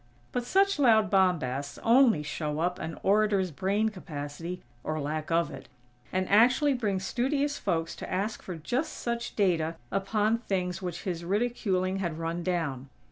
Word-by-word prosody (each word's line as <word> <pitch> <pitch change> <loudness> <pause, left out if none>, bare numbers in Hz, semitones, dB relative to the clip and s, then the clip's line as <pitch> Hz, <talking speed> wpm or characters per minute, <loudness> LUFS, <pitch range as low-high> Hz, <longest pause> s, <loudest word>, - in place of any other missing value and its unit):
But 245 -1 -2
such 390 +5 +3
loud 220 -7 +5
bombasts 145 -8 +1
only 230 - +5
show 150 0 -3
up 180 +2 0
an 160 - -5
"orator's" 200 -2 +3
brain 200 +7 +1
capacity 165 -2 -6 0.2
(or 155 0 -2
lack 155 +1 -3
of 165 0 +2
it), - - -10 0.4
and 185 0 0
actually 250 +8 +5
bring 210 -6 0
studious 275 +8 -1
folks 165 -4 -1
to - - -7
ask 205 +4 -1
for 180 - -6
just 240 - -2
such 235 0 -3
data 170 -5 +1 0.2
upon 210 +3 +1
things 185 -5 -2
which 175 -2 -5
his 175 -4 -3
ridiculing 195 -2 0
had 170 -5 -2
run 165 +1 -3
down. 160 -7 -2
185 Hz, 155 wpm, -29 LUFS, 165-220 Hz, 0.4 s, loud